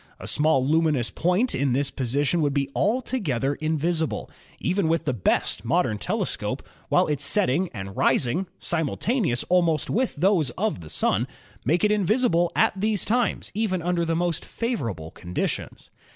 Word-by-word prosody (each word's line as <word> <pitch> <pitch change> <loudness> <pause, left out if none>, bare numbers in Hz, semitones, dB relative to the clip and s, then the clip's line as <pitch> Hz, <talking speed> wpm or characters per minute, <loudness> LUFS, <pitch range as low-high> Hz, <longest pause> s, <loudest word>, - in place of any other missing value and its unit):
A - - -8
small 150 -3 +3
lumi 160 +1 +3
nous 120 -4 -1
point 180 +9 +1
in 135 -1 +1
this 140 +2 +1
position 140 +6 0
would 145 -2 +1
be 140 -1 0
altogether 195 - 0
invisible, 160 +1 -1 0.3
even 185 0 0
with 165 0 +1
the 135 - +1
best 100 -2 0
modern 120 -5 +1
telescope, - - -2 0.2
while - - +4
its 150 -2 -1
setting 180 0 +1
and 95 -2 -7
rising, 160 +10 +1
simultaneous 170 - 0
almost 170 -4 +1
with 250 +3 0
those 175 -3 +2
of 215 - -1
the 80 - -10
Sun, 75 - +1 0.4
make 165 +8 +2
it 210 - +4
invisible 205 -4 +2
at - - +4
these 210 +1 0
times 235 -1 0
even 190 -4 -1
under 175 -1 +1
the 165 0 0
most 170 -1 -1
favor 230 - -2
able 80 -5 -7
conditions. 90 0 -4
165 Hz, 160 wpm, -25 LUFS, 135-190 Hz, 0.4 s, while